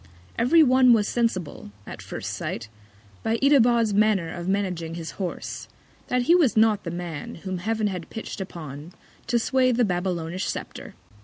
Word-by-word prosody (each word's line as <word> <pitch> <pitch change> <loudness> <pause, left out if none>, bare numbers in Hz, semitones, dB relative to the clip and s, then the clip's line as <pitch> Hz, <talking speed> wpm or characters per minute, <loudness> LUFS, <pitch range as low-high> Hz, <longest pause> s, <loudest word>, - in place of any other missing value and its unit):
Every 315 +8 +5
One 255 -2 +6
was 215 -2 +2
sensible, 195 - -2 0.2
at - - -8
first - - -6
Sight, 110 -1 -5 0.5
by 225 - 0
Itobad's 240 -5 +4
Manner 205 -5 +2
of 175 0 -6
managing 180 -4 -2
his 165 -1 -7
Horse, 180 - -5 0.4
that 250 0 +1
he 330 - +4
was 315 -11 +3
not 215 -2 +4
the - - -2
Man 170 -3 -6
whom 185 -2 -3
Heav'n 220 +3 -1
had 180 -5 -3
pitch'd 220 -2 -6
upon 160 -3 -8 0.3
to 240 - +2
sway 255 +2 +2
the 245 0 +2
Babylonish 180 -1 -2
Scepter. - - -6
205 Hz, 160 wpm, -25 LUFS, 175-235 Hz, 0.5 s, One